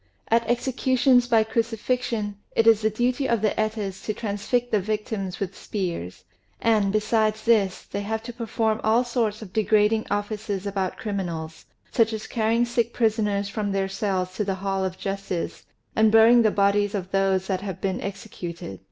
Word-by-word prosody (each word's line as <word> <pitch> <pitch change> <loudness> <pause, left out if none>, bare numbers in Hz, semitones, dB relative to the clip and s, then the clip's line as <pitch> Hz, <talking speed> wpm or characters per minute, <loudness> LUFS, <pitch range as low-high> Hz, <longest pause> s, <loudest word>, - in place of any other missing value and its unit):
At 230 0 +2
executions 255 0 +3
by 225 -2 +4
crucifixion 225 -1 -1 0.2
it 225 - +3
is 225 -2 +6
the 220 - +2
duty 245 +5 0
of 230 -3 +1
the 215 - +3
Etas 215 -3 -2
to 215 - -2
transfix 230 +3 -1
the 215 - +3
victims 205 -2 -3
with 195 -1 -3
spears; 170 - -4 0.4
and, 215 -4 +2
besides 215 0 +1
this, 210 -5 +2
they 200 - -5
have 220 +2 -3
to 240 +1 -7
perform 225 -2 -1
all 225 +3 +3
sorts 230 -3 -1
of 190 -3 -12
degrading 215 0 +2
offices 205 -1 -2
about 195 -2 -2
criminals, 170 -6 -4 0.3
such 225 -1 +2
as 220 0 -4
carrying 230 +1 +1
sick 235 -1 -1
prisoners 210 -3 +1
from 205 0 -2
their 195 -1 0
cells 190 -2 -2
to 210 - +1
the 195 -1 -1
hall 195 0 -2
of 185 -1 -3
justice, 195 -3 -4 0.3
and 220 0 +4
burying 225 +2 +7
the 220 - +4
bodies 205 +1 +2
of 190 -1 -4
those 195 -1 +2
that 190 -1 -2
have 190 -3 -5
been 190 -1 -2
executed. 175 - -7
215 Hz, 170 wpm, -25 LUFS, 195-225 Hz, 0.4 s, burying